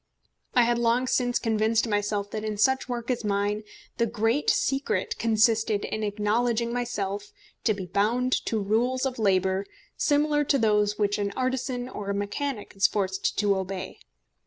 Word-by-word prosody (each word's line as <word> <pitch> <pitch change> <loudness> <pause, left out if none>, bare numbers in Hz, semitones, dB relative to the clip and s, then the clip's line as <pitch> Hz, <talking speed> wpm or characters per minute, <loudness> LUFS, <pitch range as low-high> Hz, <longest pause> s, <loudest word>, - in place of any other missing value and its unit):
I 245 - +6
had 235 0 +1
long 235 +2 +2
since 245 -1 +1
convinced 220 +1 +1
myself 205 -1 -1
that 215 -1 -4
in 215 -1 -3
such 265 +5 +2
work 240 0 -2
as 245 -2 -2
mine 205 0 0 0.4
the 235 - +2
great 225 +5 +1
secret 265 -8 0
consisted 220 -1 +2
in 215 - -3
acknowledging 225 +3 0
myself 205 -4 -3 0.3
to 215 - +3
be 190 -2 -5
bound 230 +8 +1 0.2
to 225 - 0
rules 235 +6 +1
of 255 -3 -3
labour 190 -2 +2 0.3
similar 295 0 +2
to 280 -1 +2
those 210 -3 +2
which 205 -1 +1
an 200 0 -1
artisan 255 -1 -2
or 205 -5 -6
a 200 - 0
mechanic 205 +4 -3
is 195 - +4
forced 190 -2 -1
to 205 -1 +3
obey. 190 0 -5
220 Hz, 160 wpm, -26 LUFS, 205-245 Hz, 0.4 s, I